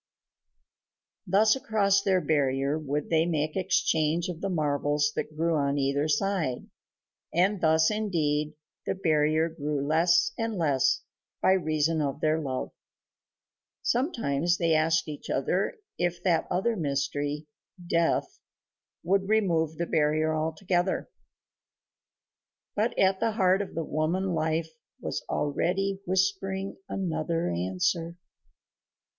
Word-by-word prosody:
Thus 210 +5 +4
across 200 -6 +2
their 190 -2 +2
barrier 140 -1 +1
would 150 0 -3
they 165 0 +3
make 155 -2 -1
exchange 170 -2 +1
of 175 -2 -6
the 195 - -1
marvels 150 -2 +1
that 155 - -4
grew 165 +1 +1
on 140 -2 +1
either 140 +2 +1
side, 165 -5 0 0.7
and 185 +3 +2
thus, 160 +1 +4
indeed, 155 -8 -1 0.3
the - - 0
barrier 155 -3 +2
grew 150 -3 -3
less 165 +3 +3
and 225 -1 -1
less 145 -6 +2 0.4
by - - +3
reason 160 -3 +1
of 140 0 -2
their 155 +1 +1
love. 130 -3 -3 1.1
Sometimes 175 - 0
they 165 -1 +2
asked 160 +1 +2
each 150 -1 -8
other 180 +8 0 0.2
if 175 0 -1
that 170 -4 +2
other 225 +6 0
mystery, 145 -1 -2 0.4
Death, 170 -1 0 0.6
would 195 +2 +1
remove 165 -8 +1
the 170 - -1
barrier 155 0 +1
altogether.... 175 - -1 1.6
But 215 +3 0
at 190 0 +3
the 225 - 0
heart 190 -2 +3
of 200 - -7
the 165 - -1
woman 170 +5 -1
Life 160 0 -1 0.3
was - - -4
already 190 +7 0
whispering 190 +1 -1
another 165 - -1
answer. 170 - -1
165 Hz, 120 wpm, -27 LUFS, 150-190 Hz, 1.6 s, Thus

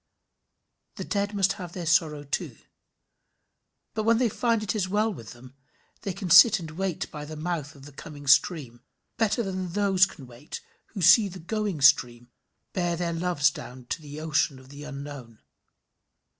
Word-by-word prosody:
The - - -5
dead 205 0 -2
must 195 +1 +2
have 175 -3 -9
their 175 -2 -5
sorrow 155 -2 +2
too, 140 - -4 1.4
but 220 - -1
when 225 +1 +3
they 245 -1 +2
find 230 0 0
it 215 - -1
is 190 -3 -1
well 210 +2 +1
with 115 - -10
them, 125 +1 -15 0.5
they 200 - -3
can 185 -1 -5
sit 215 -3 +8
and 160 -2 -8
wait 185 0 -3
by 150 -1 -7
the 155 +1 -8
mouth 155 -2 -4
of 140 -1 -14
the 145 - -11
coming 145 +1 -11
stream 140 -4 +2 0.4
better 225 +1 +1
than 185 -3 -4
those 195 -1 +3
can 145 -8 -12
wait 125 - -9 0.4
who 195 - -3
see 185 +6 +7
the 190 -1 -9
going 200 -2 -3
stream 120 -4 +3 0.4
bear 175 -2 0
their 170 0 -2
loves 165 -4 +1
down 125 -2 -10
to - - -3
the 145 0 -9
ocean 155 -3 0
of 130 0 -16
the 145 +1 -10
unknown. 140 -5 -8
165 Hz, 175 wpm, -26 LUFS, 145-195 Hz, 1.4 s, sit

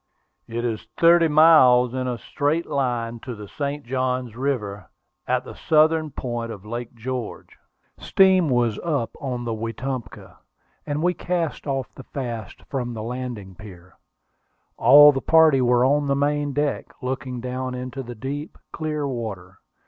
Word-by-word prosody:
It 120 +1 -3
is 110 -3 -3
thirty 170 0 +6
miles 150 -6 +6
in 130 -1 -2
a 125 -1 -2
straight 150 +7 -1
line 120 -4 -2
to 125 +1 -7
the 105 -1 -9
St. 145 +4 -4
Johns 125 -2 -2
River, 120 -7 -3 0.4
at - - +1
the - - -9
southern 155 0 +2
point 120 -4 -4
of 105 -2 -10
Lake 120 +2 -6
George." 125 0 -6 0.4
Steam 190 -4 +4
was 120 -4 +1
up 145 -9 -2
on 125 -3 -4
the 115 - -2
Wetumpka, 115 +1 -6 0.5
and 150 +2 -2
we 180 0 +2
cast 170 -4 -3
off 135 -2 -3
the - - -11
fasts 120 -7 -6
from 120 -3 -3
the 110 - -5
landing 120 -5 -6
pier. 90 -3 -13 0.8
All 145 +1 +8
the 135 -2 -3
party 160 -4 +5
were 125 0 +3
on 145 +2 +2
the 140 - +2
main 145 +1 0
deck, 145 +1 -1 0.2
looking 130 -1 -4
down 130 +1 -4
into 125 +2 -5
the 120 -1 -8
deep, 145 +7 -6 0.2
clear 150 -2 -2
water. 105 -8 -6
130 Hz, 155 wpm, -23 LUFS, 120-145 Hz, 0.8 s, All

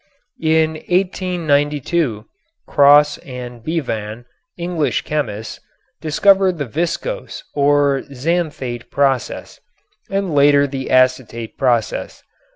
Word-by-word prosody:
In 160 0 +3 0.2
1892, 160 - 0 0.4
Cross 145 +1 +5
and 125 -3 -9
Bevan, 120 -7 -3 0.3
English 170 -8 -1
chemists, 110 -8 -4 0.4
discovered 190 +3 +3
the 145 - -2
viscose 170 - -3
or 145 -1 +2
xanthate 135 -4 -3
process, 135 -4 -1 0.5
and 195 -4 -1
later 145 0 +5
the 135 -1 -5
acetate 130 -3 +1
process. 120 -5 -1
145 Hz, 85 wpm, -19 LUFS, 125-165 Hz, 0.5 s, Cross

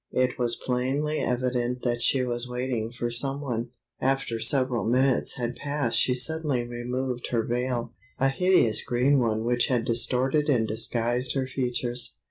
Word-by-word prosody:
It 130 0 +1
was 120 -1 +1
plainly 135 +6 -1
evident 125 0 -1
that 120 -1 0
she 130 +2 +3
was 120 0 -3
waiting 125 -2 -2
for 120 0 -3
some 135 +4 0
one. 120 -4 -3 0.3
After 135 -3 0
several 125 +1 +2
minutes 130 +2 +2
had 120 -1 -3
passed 145 -2 0
she 125 - +3
suddenly 140 -3 0
removed 125 +1 -3
her 115 -2 0
veil—a 120 0 -2
hideous 155 - +3
green 130 +3 +2
one 110 -2 0
which 120 0 +2
had 120 -3 0
distorted 130 +5 +1
and 115 -5 +2
disguised 120 +3 -1
her 135 -1 0
features. 125 -2 -2
125 Hz, 150 wpm, -26 LUFS, 120-130 Hz, 0.3 s, she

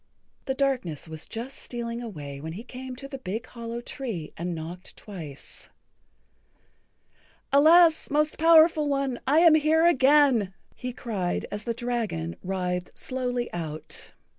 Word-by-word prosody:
The 265 - -1
darkness 250 - -1
was 160 0 -7
just 240 +4 -6
stealing 235 -1 -5
away 145 -11 -7
when 160 +1 -5
he 210 +6 -7
came 255 +1 -8
to 275 +2 -8
the 275 -1 -7
big 220 +2 -4
hollow 235 0 -6
tree 230 - -5
and 175 +1 -3
knocked 170 +3 -8
twice. 160 -9 -10 1.8
"Alas, 320 +3 +6
Most 300 +1 +1
Powerful 320 -2 +6
One, 275 -3 0
I 300 +4 +5
am 335 -2 +8
here 315 +1 +4
again," 270 - +4 0.2
he 250 0 -5
cried, 205 -7 -2
as 210 +1 -5
the 235 - -1
dragon 225 - -2
writhed[Pg 180 -1 -2
68] - - -25
slowly 250 -1 -3
out. 160 -3 -6
240 Hz, 140 wpm, -26 LUFS, 180-275 Hz, 1.8 s, am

